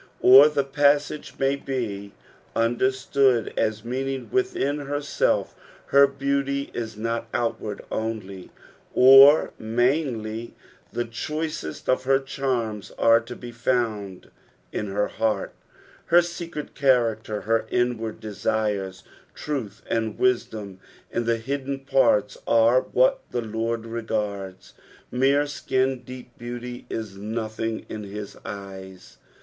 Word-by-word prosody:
Or 135 +4 +9
the 145 -2 0
passage 145 +2 +1
may 135 +1 +2
be 115 -8 -4 0.4
understood 130 +1 +2
as 110 -1 -1
meanmg 130 +2 -3
within 370 - 0
herself 145 0 0 0.2
— - - -25
her 140 0 +8
beauty 140 0 -1
is 110 -2 -5
not 115 +1 -2
outward 115 -3 -2
only 105 -4 -4 0.5
or 135 +4 +8
mainly; 115 -1 -1 0.4
the 120 - -2
chniceat 150 - -5
of 130 0 +1
her 135 0 +4
charms 125 -6 -3
are 115 0 +5
to 115 +2 -9
be 120 0 -9
found 115 -6 -2 0.4
in 105 - -3
her 105 +1 0
heart, 110 -3 -1 0.5
her 175 +1 +6
secret 170 -3 -6
character, 115 -6 +1
her 115 +1 0
inward 120 -2 -1
desires. 105 -3 -2 0.3
Truth 115 -9 -5
and 110 -2 -1
wisdom 110 -6 -1 0.3
in 120 - -1
the 115 0 +2
hidden 135 +3 -3
parts 135 -6 +2
are 115 +2 +5
what - - +2
the 120 - -2
Lord 115 +1 -2
regards; 105 -4 -4 0.4
mere 135 +3 +3
skin 130 -2 -1
deep 125 -1 -11
beauty 120 +1 -7
is 110 -4 -5
nothing 110 +1 -4
in 110 - -6
his 100 0 -7
eyes. 95 -2 -9
120 Hz, 120 wpm, -24 LUFS, 110-135 Hz, 0.5 s, Or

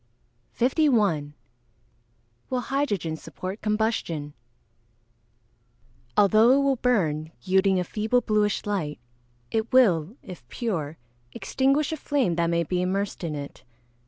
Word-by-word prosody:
51. 215 - +2 1.1
Will 255 - 0
hydrogen 235 - -1
support 185 +5 -7
combustion? 210 -9 -1 1.8
Although 215 +4 +6
it 280 +1 +3
will 275 -1 +2
burn, 160 -11 0
yielding 190 0 +3
a - - 0
feeble 220 +7 0
bluish 210 -2 0
light, 185 -8 -2 0.5
it 220 0 -1
will, 195 -7 +4
if 175 -10 -11
pure, 165 - -3 0.4
extinguish 275 +3 +1
a 315 - -2
flame 270 - 0
that 170 0 +1
may 170 0 +1
be 180 +2 -1
immersed 190 +1 -2
in 160 -3 -3
it. 140 -2 -8
200 Hz, 115 wpm, -25 LUFS, 170-245 Hz, 1.8 s, Although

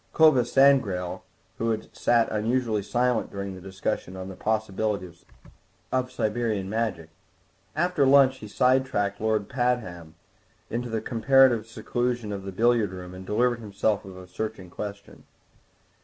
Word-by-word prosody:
Clovis 135 -7 +5
Sangrail 125 -11 +3 0.4
had 115 -1 -2
sat 120 -1 +3
unusually 110 0 0
silent 120 +2 0
during 100 -1 -5
the 95 - -10
discussion 95 0 -4
on 95 0 -6
the 95 - -8
possibilities 105 -4 -2 0.7
of 130 0 0
Siberian 110 -4 -1
Magic; 100 -6 -2 0.7
after 175 -2 +1
lunch 135 -1 +5
he 110 - -9
side 130 +4 +3
tracked 105 -6 -2
Lord 110 -2 0
Pabham 110 -11 -2 0.6
into 120 +1 -3
the 110 -1 -2
comparative 120 -1 +4
seclusion 120 -1 -2
of 100 - -5
the 95 - -5
billiard 115 +1 +2
room 90 -1 -8
and 95 0 -10
delivered 120 +3 +1
himself 105 -1 -1
of 95 -1 -11
a 95 - -10
searching 95 -1 -6
question. 100 0 -8
110 Hz, 140 wpm, -26 LUFS, 100-125 Hz, 0.7 s, Clovis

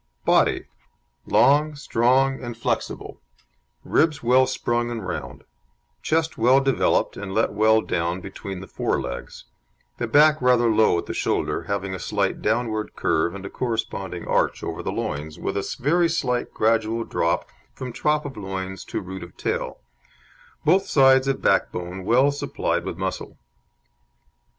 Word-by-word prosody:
BODY - - +3 0.6
Long, 150 +2 +4
strong, 135 0 +1
and 120 -2 -6
flexible; 120 - -3 0.6
ribs 155 -4 +1
well 130 +2 +4
sprung 120 -2 -1
and 115 -5 -5
round, 90 - -6 0.6
chest 160 -2 0
well 125 +4 +5
developed 135 -1 +1
and 100 -1 -6
let 110 - +1
well 110 +1 +4
down 85 -1 -1
between 95 0 -7
the 95 - -9
fore - - -1
legs; - - -6 0.6
the - - -1
back 155 0 +5
rather 125 -2 +4
low 110 -5 +4
at 85 - -3
the - - -5
shoulder, - - -1
having 100 -1 -2
a 95 - -5
slight 100 -2 -1
downward 110 -1 -1
curve 85 +3 0
and 100 0 -8
a - - -5
corresponding 110 -7 -3
arch - - +1
over - - -4
the - - -3
loins, 75 +2 -4
with - - -3
a 100 - -3
very 165 +6 +2
slight 125 -7 -1
gradual 115 +1 +1
drop 85 -6 -1 0.3
from 125 -2 -6
top 150 +3 0
of 140 - -6
loins 95 -2 -5
to - - -4
root 95 +1 -7
of 85 - -11
tail; - - -3 0.8
both 190 +5 +3
sides 135 -3 +5
of 135 - -1
backbone 90 +2 0
well 130 +8 +4
supplied 145 - -2
with - - -5
muscle. - - -4
115 Hz, 150 wpm, -23 LUFS, 95-135 Hz, 0.8 s, well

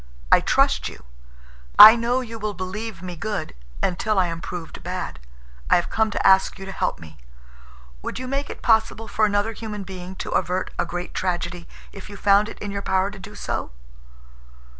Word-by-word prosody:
I - - +8
trust - - +2
you. - - -13 0.7
I 220 +2 +12
know 240 +2 0
you 230 -2 -8
will 210 -1 -3
believe 185 +1 -6
me 180 -1 -6
good 175 0 -4 0.3
until 205 +4 0
I 185 - +4
am 165 -1 -4
proved 170 -2 -7
bad. 180 - -5 0.5
I - - +6
have 175 - 0
come 220 0 +2
to - - -3
ask 190 0 +4
you 195 - -8
to 195 - -6
help - - -2
me. 80 -2 -13 0.8
Would - - -5
you 255 +1 -5
make 275 +2 -2
it - - -9
possible 225 -1 +2
for 215 - +2
another 205 +2 0
human 210 -2 -6
being 185 0 -8
to - - -6
avert 185 +1 -1
a - - 0
great 175 +1 -5
tragedy 175 -1 -3 0.2
if 195 +1 -11
you 205 - -9
found 205 +2 +4
it - - -10
in 205 - -5
your 200 0 -3
power 190 0 0
to 205 - -11
do 200 +2 -11
so?" - - -4
195 Hz, 195 wpm, -23 LUFS, 180-215 Hz, 0.8 s, I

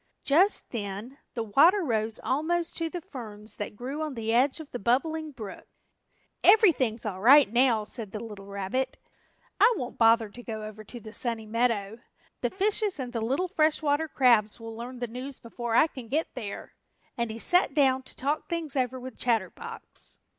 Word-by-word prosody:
Just 355 +9 +3
then 215 +5 -5 0.2
the 230 - -1
water 325 - +5
rose 225 -5 0
almost 330 +5 0
to 330 -1 -1
the 350 +1 -5
ferns 220 - -8
that 205 0 -5
grew 265 +7 -5
on 305 -3 -3
the 225 -1 -2
edge 265 +6 +3
of 310 -2 -10
the 245 - -4
Bubbling 310 +8 0
Brook. 220 -7 -9 0.8
"Everything's 275 - +5
all 190 -3 -4
right 275 +6 +8
now," 240 -3 +4
said 210 -1 -5
the 215 - -5
little 210 -3 -9
rabbit, 200 +7 -2 0.6
"I 435 +5 +7
won't 250 -5 -6
bother 225 -1 +5
to 240 +4 -11
go 220 -2 -6
over 215 0 -8
to 240 +3 -10
the 220 -1 -11
Sunny 230 -3 -2
Meadow. 225 -1 0 0.4
The - - +1
fishes 400 -1 0
and 250 -1 -5
the 230 - -2
little 270 +11 0
fresh 315 -2 +2
water 295 +2 +1
crabs 235 -7 +3
will 225 0 -8
learn 245 +3 -7
the 245 0 -3
news 255 +4 -7
before 235 0 -4
I - - +7
can 260 -7 -9
get 305 +7 -1
there," 220 -6 -7 0.4
and 235 -3 -1
he 220 - -5
sat 355 +3 +2
down 265 -3 +4
to - - -10
talk 290 +3 -2
things 330 -4 -3
over 255 -1 0
with 255 -1 -9
Chatterbox. 245 - -3
250 Hz, 185 wpm, -28 LUFS, 225-295 Hz, 0.8 s, right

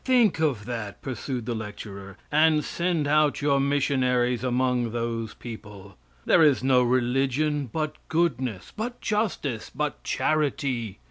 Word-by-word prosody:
Think 245 -8 +3
of 135 -10 0
that, 115 -4 -5
pursued 130 -2 -4
the 120 - -2
lecturer, 100 -3 -7
and 155 0 +4
send 170 -3 0
out 150 -2 +3
your 140 -1 +3
missionaries 130 -3 +1
among 125 -2 +1
those 115 -2 -3
people. 105 -4 -10 0.3
There 170 - +5
is 145 -5 +4
no 130 -1 +4
religion 135 +4 +1
but 155 -1 -2
goodness, 135 - -1
but 240 +3 -4
justice, 200 - -2
but 150 +1 -3
charity. 140 -8 -1
130 Hz, 130 wpm, -26 LUFS, 120-150 Hz, 0.3 s, There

